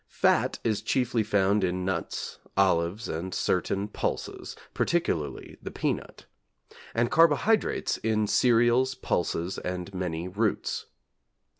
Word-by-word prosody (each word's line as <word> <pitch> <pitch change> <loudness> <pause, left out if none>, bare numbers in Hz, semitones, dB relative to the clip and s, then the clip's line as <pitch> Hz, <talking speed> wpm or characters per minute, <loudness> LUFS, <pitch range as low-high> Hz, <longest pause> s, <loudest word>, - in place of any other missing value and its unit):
Fat - - +2
is 110 -3 0
chiefly 125 -3 +1
found 105 -1 +2
in 90 0 -1
nuts, 95 - -3 0.2
olives, 95 +2 +2
and 90 +3 -4
certain 100 +1 0
pulses, 105 - -4 0.2
particularly 80 - -1
the - - -6
peanut; - - -3 0.7
and 120 +1 +1
carbohydrates 165 +7 +3
in 110 -1 +1
cereals, 120 +3 +3
pulses, 85 +1 -1
and 90 +1 -5
many 90 -2 -3
roots. 105 +3 -1
100 Hz, 110 wpm, -27 LUFS, 90-120 Hz, 0.7 s, carbohydrates